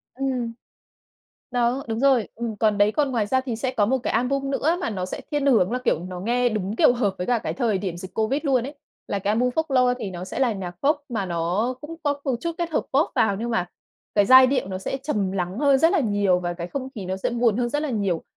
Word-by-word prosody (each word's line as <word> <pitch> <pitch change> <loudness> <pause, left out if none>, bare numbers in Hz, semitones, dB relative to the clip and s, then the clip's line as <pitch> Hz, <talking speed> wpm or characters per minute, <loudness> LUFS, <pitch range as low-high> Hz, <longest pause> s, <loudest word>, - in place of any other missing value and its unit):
Ừm, 255 -3 -2 1.0
đó, 245 +2 +1
đúng 225 0 -2
rồi, 265 -5 +3
ừm. 230 -2 -4
Còn 210 -1 +2
đấy, 205 +1 +4
còn 290 -2 +1
ngoài 225 -5 0
ra 260 +5 +2
thì 245 -4 -4
sẽ 255 +2 -1
có 210 -5 +1
một 260 +4 +1
cái - - -3
album 275 +4 0
nữa 310 +5 +1
mà 230 - -2
nó 185 -3 -3
sẽ - - -6
thiên 290 -2 0
hướng 225 -7 +4
là, 250 - 0
kiểu, 160 - +2
nó 180 -1 -6
nghe 245 +4 +1
đúng, 210 -1 -3
kiểu, - - +5
hợp 210 -6 0
với 180 - -3
cả 245 -1 +2
cái - - -4
thời 225 -7 0
điểm 185 -3 -4
dịch 185 +2 -9
Covid 235 +7 0
luôn 260 -4 +2
ấy, 285 - -8 0.3
là 200 - -1
cái 195 +1 -1
album 245 +3 +2
Folklore. 255 -3 +2
Thì 205 -5 -4
nó 175 0 -6
sẽ 185 - -6
là 255 -4 +2
nhạc 185 -4 -5
Pop 295 +3 +3
mà 215 -6 -2
nó 180 +8 -1
cũng 315 +2 -8
có 285 -1 -1
một 270 -4 0
chút 335 - -2
kết 340 -1 -2
hợp - - +1
Pop 285 +4 +2
vào 200 -3 +2
nhưng 235 +4 -3
mà 180 -6 0 0.5
cái 205 - +4
giai 260 +1 +9
điệu 260 -6 0
nó 185 -1 -4
sẽ 190 - -3
trầm 205 -10 -1
lắng 185 +1 -3
hơn 280 -1 +4
rất 325 +6 +4
là 375 - +3
nhiều 205 -6 +2
và 175 -1 -2
cái 170 0 -5
không 260 +6 -5
khí 200 -4 -6
nó 185 +1 -2
sẽ 190 - -2
buồn 235 -3 +2
hơn 240 0 0
rất 295 +5 -1
là 300 - -2
nhiều. 200 -8 -1
235 Hz, 270 wpm, -24 LUFS, 200-265 Hz, 1.0 s, giai